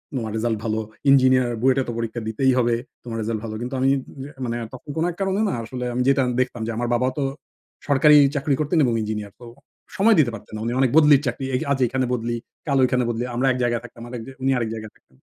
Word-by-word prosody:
তোমার 110 -4 -3
রেজাল্ট 110 -1 0
ভালো। 110 -1 -1 0.3
ইঞ্জিনিয়ার 130 -2 +5
বুয়েটে 130 +1 +3
তো - - -2
পরীক্ষা 115 0 -3
দিতেই 130 +4 +2
হবে। 120 -1 +2 0.3
তোমার 115 -2 -5
রেজাল্ট 110 0 -2
ভালো।" 110 -1 -5
কিন্তু 125 +2 -5
আমি 135 +1 +3 0.3
উম 135 - -6
এ - - -10 0.2
মানে 120 0 -2 0.2
তখন 130 +3 -11
কোন 160 - +1
এক - - -12
কারণে 195 +1 0
না - - -2
আসলে 125 +2 -5
আমি 125 - 0
যেটা 135 0 +4
আন 125 - -1
দেখতাম 125 -2 -3
যে - - -2
আমার 120 0 -1
বাবা 125 +2 +1
তো 140 - 0 0.6
সরকারি 150 +1 +6 0.2
চাকরি 140 0 +1
করতেন 155 +3 0
এবং 120 - +1
ইঞ্জিনিয়ার। 105 -2 -4
তো - - -10 0.5
সময় 215 +2 +5
দিতে 125 -6 +3
পারতেন 110 - -10
না। - - -5
উনি 120 - -1
অনেক 130 -3 +3
বদলির 150 -3 +6
চাকরি। 130 +2 -3
এ - - +3
আজ 135 - +1
এখানে 130 +2 -1
বদলি, 120 0 -2 0.3
কাল 140 -1 +2
ঐখানে 125 0 +2
বদলি। 120 +1 -2
আমরা 130 +2 +1
এক 125 - -1
জায়গায় 120 -1 0
থাকতাম 115 0 -12
আরেক 120 -1 -6
যে - - -8
উনি 135 +1 +2
আরেক 115 -2 -1
জায়গায় 110 -1 -7
থাকতেন 65 - -30
125 Hz, 245 wpm, -23 LUFS, 115-135 Hz, 0.6 s, সরকারি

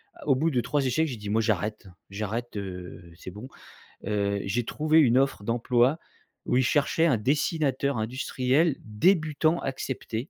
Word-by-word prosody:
a - - -13
au 135 - +4
bout 160 +5 +1
de 125 -2 +1
3 140 +3 -1
échecs, 155 +5 +1
j'ai 130 - -4
dit: 105 -1 -7
«Moi 110 +2 +2
j'arrête, 105 -1 -2 0.2
j'arrête, 110 +4 -4
heu, 90 -3 -8
c'est 95 - -9
bon», 105 +7 -9 0.6
heu, 100 -1 0
j'ai 115 +5 -1
trouvé 155 +3 +2
une 125 -4 +4
offre 135 -6 +1
d'emploi 120 +6 +2 0.5
où - - 0
ils 130 - +3
cherchaient 150 +4 +2
un 135 -8 +3
dessinateur 140 +1 0
industriel, 130 +6 0
débutant 155 - +1
accepté. 130 -1 -4
125 Hz, 165 wpm, -26 LUFS, 105-145 Hz, 0.6 s, au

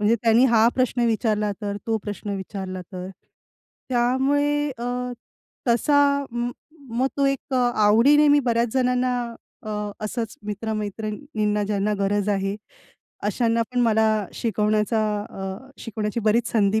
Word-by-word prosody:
म्हणजे 210 +2 +4
"त्यांनी 230 +2 +5
हा 230 -2 +5
प्रश्न 255 -1 +1
विचारला 215 -2 +1
तर? 200 -1 -2
तो 225 -1 +1
प्रश्न 205 0 -5
विचारला 190 -1 -5
तर?" 185 0 -6 0.8
त्यामुळे 280 +4 +1
अ, 235 - -4 0.8
तसा 280 +4 +3
म 240 +1 -2 0.5
मग 260 - +3
तो 280 - +2
एक 275 0 -2
आवडीने 245 +4 +4
मी 290 - +6
बऱ्याच 235 0 +2
जणांना 250 -1 +2 0.5
अ, 215 - -6 0.3
असंच 225 +1 -4
मित्र-मैत्रिणींना 215 +1 -2
ज्यांना 205 0 0
गरज 200 +1 0
आहे, 195 0 0 0.7
अशांना 230 +3 +1
पण 250 - +1
मला 220 -3 +2
शिकवण्याचा 215 0 +1 0.3
अ, 195 +7 -7
शिकवण्याची 220 0 -3
बरीच 220 +2 +2
संधी 215 -1 +3
225 Hz, 125 wpm, -23 LUFS, 210-250 Hz, 0.8 s, मी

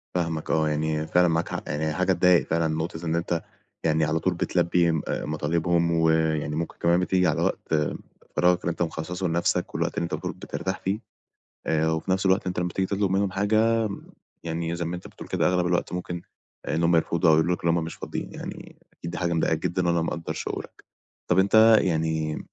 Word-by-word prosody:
فاهمك، 85 -3 -2
آه، 80 -1 +2
يعني 75 +1 -1
فعلًا 90 +1 +4
معاك، 80 0 -1
يعني 75 +1 -2
هي 75 - -1
حاجة 95 +2 +2
تضايق 90 0 +4
فعلًا، 80 0 +1
نقطة 80 +1 -3
إن 80 +1 0
أنت 85 0 -1 0.4
يعني 80 -1 +2
على 80 +2 0
طول 90 +2 0
بتلبي 85 0 +2
م 80 -2 0
آآ، - - -2
مطالبهم، 85 +3 0
و 80 -1 +3
يعني 80 -2 +1
ممكن 85 +1 -3
كمان 85 +1 +3
بتيجي 90 -1 +2
على 80 - +1
وقت - - -2 0.6
فراغك 90 0 +3
اللي - - -1
أنت 85 - -7
مخصصه 85 +2 -2
لنفسك، 85 +1 0
والوقت - - -1
اللي - - +1
أنت 85 - -4
بتقول - - -3
بترتاح 95 0 -4
فيه، 100 +3 -2 0.7
آآ، 80 0 +2
و 80 - 0
في 95 - -6
نفس 95 +1 +1
الوقت 95 +1 +2
أنت 90 -1 -3
لما 90 - 0
تيجي 95 -1 +1
تطلب 100 -1 0
منهم 95 0 +1
حاجة، 110 +3 +2 0.6
يعني 85 0 -2
زي 85 - -3
ما 85 +2 -3
أنت 90 - -10
بتقول - - -11
كده، - - +1
أغلب 90 -1 +1
الوقت 90 0 0
ممكن 90 -1 -4 0.4
آآ، - - -1
إن 80 - 0
هم 85 0 +4
يرفضوا 85 +1 +2
أو - - +7
يقولوا 85 +3 +2
لك - - -16
إن - - +3
هم 85 -1 +1
مش 80 - -6
فاضيين، - - -6
يعني - - -8 0.2
أكيد 85 - -7
دي - - -5
حاجة 85 -1 0
مضايقاك 80 -1 +1
جدًا، 90 0 0
وأنا 85 -1 +2
مقدر 80 0 -3
شعورك. - - -6 0.5
طب 90 - +4
أنت 110 +3 +6
يعني 80 -2 0
85 Hz, 215 wpm, -25 LUFS, 80-90 Hz, 0.7 s, أو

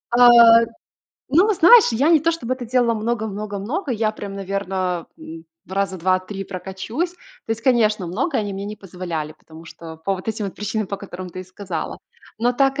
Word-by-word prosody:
Э, 235 -1 +8 0.6
ну, 365 +10 +4
знаешь, 380 - +7
я 275 +8 +2
не 325 -3 +6
то 330 +3 +2
чтобы 255 -7 -2
это 250 -2 -8
делала 240 -1 +2
много-много-много, 220 - -3
я 220 -1 0
прям, 200 -2 -8
наверно, 190 -3 -3
м, 160 0 -10 0.2
раза 195 0 -1
2-3 185 +2 -1
прокачусь. 195 - -4 0.3
То - - -9
есть, 225 +1 -6
конечно, 215 -7 +2
много 235 - -2
они 205 -2 -2
мне 195 +1 -5
не 210 +1 -6
позволяли, 175 -6 -5
потому 160 +1 -15
что 160 0 -10
по 195 +2 +1
вот 185 +4 -8
этим 220 -1 -2
вот 195 - -5
причинам, 210 0 -3
по 200 - -4
которым 185 -2 -8
ты 185 - -9
и - - -9
сказала. 185 -3 -6 0.4
Но 240 +2 +2
так 275 +2 +1
210 Hz, 185 wpm, -21 LUFS, 185-240 Hz, 0.6 s, Э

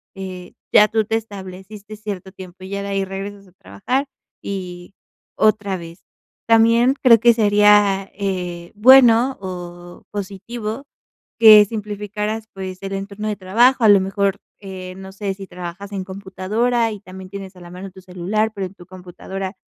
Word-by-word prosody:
eh, 185 -2 -8 0.2
ya 210 0 +7
tú 220 0 0
te 225 - -1
estableciste 200 0 -9
cierto 200 -3 -7
tiempo, 185 -1 -12
y 190 - -8
ya 200 0 -3
de 200 - -5
ahí 195 0 -1
regresas 195 +1 -7
a - - -21
trabajar, 185 - -3 0.3
y 180 -2 -7 0.4
otra 205 -3 +2
vez. 170 -1 -11 0.5
También 230 +3 +4
creo 235 -3 +7
que 235 +2 +5
sería, 205 -2 +4
eh, 180 -3 -4
bueno 250 +2 +6
o 175 -1 -8
positivo 210 +5 -6 0.5
que 215 -2 +9
simplificaras, 210 +1 -4
pues, 185 -1 -7
el 195 0 -5
entorno 200 +2 -5
de 210 - -1
trabajo, 235 +7 +3
a 220 - +6
lo 200 -1 +7
mejor, 195 +1 -1 0.2
eh, 185 -2 -8
no 190 0 -10
sé 195 0 -4
si 195 0 -10
trabajas 180 +3 -8
en 195 -2 -4
computadora 200 +5 -1
y 210 -2 -8
también 185 -1 -11
tienes 195 -1 -9
a - - -14
la 175 - -11
mano 185 +2 -9
tu 190 - -14
celular, 185 +4 -2
pero 195 -1 -3
en 180 - -16
tu 175 - -15
computadora 185 +1 -8
195 Hz, 165 wpm, -20 LUFS, 185-215 Hz, 0.5 s, que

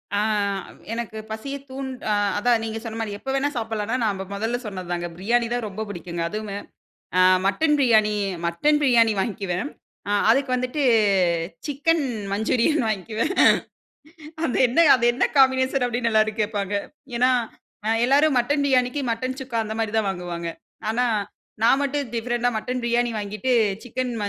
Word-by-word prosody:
ஆ - - +2 0.7
எனக்கு 230 -1 -5
பசியை 275 +6 -5
தூண் 265 0 -5 0.2
அ - - +2 0.3
அதான் 235 +2 +2
நீங்க 225 0 -4
சொன்ன 225 -1 -6
மாரி 215 -2 -3
எப்ப 270 - -8
வேணா 275 +1 +1
சாப்பிடலான்னா, 225 0 -2
நம்ப 200 -3 -1
மொதல்ல 225 +4 -1
சொன்னது 185 -4 -6
தாங்க 175 0 -2
பிரியாணி 230 +6 +1
தான் 245 -2 -2
ரொம்ப 205 +1 -6
புடிக்குங்க. 175 -3 -5
அதுவுமே 210 0 -5 0.6
அ - - +6 0.2
மட்டன் 295 +11 +2
பிரியாணி 220 -5 +4 0.3
மட்டன் 295 - +2
பிரியாணி 235 -5 +4
வாங்கிக்குவேன், 195 +2 -2 0.4
அ - - 0 0.2
அதுக்கு 270 +3 +3
வந்துட்டு 255 +4 -2 0.8
சிக்கன் 300 +3 +1 0.3
மஞ்சூரியன் 240 +7 +1
வாங்க்குவேன். 220 - -2 1.1
அந்த 250 - -1
என்ன 295 +8 +4
அது 240 -2 0
என்ன 245 - +2
காம்பினேஷன் 260 -1 +4
அப்படின்னு 240 -1 -1
எல்லாரும் 215 0 +2
கேப்பாங்க. 205 -1 -2 0.4
ஏன்னா, 250 +2 +4 0.6
அ - - +2 0.2
எல்லாரும் 280 +2 +4
மட்டன் 285 +4 +1
பிரியாணிக்கு, 255 0 +2
மட்டன் 255 +3 -3
சுக்கா 255 -3 -4
அந்த 215 0 -5
மாரி 220 -2 -1
தான் 205 -3 0
வாங்குவாங்க. 175 -2 -5 0.4
ஆனா 245 +3 +1 0.6
நான் 235 +4 +5
மட்டும் 285 0 -1
டிஃபரண்ட்டா 240 +1 0
மட்டன் 250 +3 -3
பிரியாணி 240 0 +1
வாங்கிட்டு, 210 +4 -3 0.3
சிக்கன் 250 0 -3
235 Hz, 150 wpm, -23 LUFS, 210-260 Hz, 1.1 s, அ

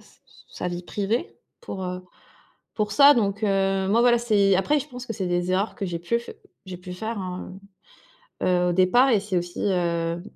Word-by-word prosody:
se - - -23 0.4
sa 180 - -3
vie 175 0 -5
privée 210 - -2 0.3
pour, 195 - -7
heu, 180 0 -4 0.7
pour 210 -1 -2
ça. 280 +6 +7
Donc 205 -4 0
heu, 195 -1 +1
moi, 220 +4 +3
voilà, 240 0 +5
c'est 205 -5 +3
après 290 +11 +2
je 285 - -7
pense 250 -2 -9
que 225 - -5
c'est 190 -2 -3
des 175 0 -1
erreurs 195 +4 0
que 205 - -4
j'ai 170 -2 -4
pu 235 +8 0
f 235 - -11 0.4
j'ai 185 -1 -7
pu 180 0 -9
faire, 220 +5 -5
hein, 185 -1 -6 0.9
heu, - - +1
heu, 180 -1 +2
au - - +1
départ 190 +9 +4
et 225 - +4
c'est 200 -2 -3
aussi, 175 0 -3
heu, 170 -3 -1
195 Hz, 210 wpm, -24 LUFS, 180-225 Hz, 0.9 s, ça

